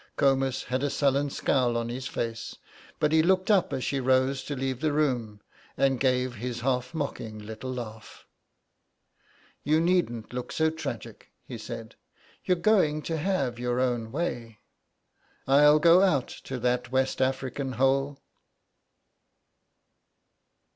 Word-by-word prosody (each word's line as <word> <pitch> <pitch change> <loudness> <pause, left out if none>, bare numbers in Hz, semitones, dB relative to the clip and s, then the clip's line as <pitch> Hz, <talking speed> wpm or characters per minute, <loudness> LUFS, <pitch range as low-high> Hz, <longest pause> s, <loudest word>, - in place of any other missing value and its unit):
Comus 135 -1 +1
had 130 +1 -2
a 145 - 0
sullen 140 0 +1
scowl 125 -3 +1
on 115 0 -2
his 130 +2 -4
face, 115 -3 -4 0.4
but 150 - +2
he 160 0 +5
looked 185 +4 +2
up 195 -4 +3
as 130 - -2
she 140 - -1
rose 130 +1 +2
to 145 - -4
leave 130 -1 -2
the 155 -1 +1
room, 125 -8 -1 0.4
and 135 -2 +2
gave 130 -1 +1
his 120 +1 -4
half 125 +3 -1
mocking 120 -7 -4
little 110 +4 -7
laugh. 110 -3 -8 1.4
"You 155 +2 +3
needn't 165 -11 0
look 125 0 -5
so 160 0 +1
tragic," 160 -3 -7 0.2
he 120 - -8
said, 115 0 -8 0.5
"You're 180 - +2
going 170 -6 +2
to 165 - -2
have 145 -8 -1
your 125 0 -1
own 120 -3 -1
way. 120 -7 -3 0.9
I'll 150 +2 +6
go 170 +3 +6
out 155 -10 +2 0.2
to 135 - -4
that 125 0 -1
West 130 0 0
African 130 0 -1
hole." 135 +2 +1
130 Hz, 140 wpm, -27 LUFS, 125-150 Hz, 1.4 s, I'll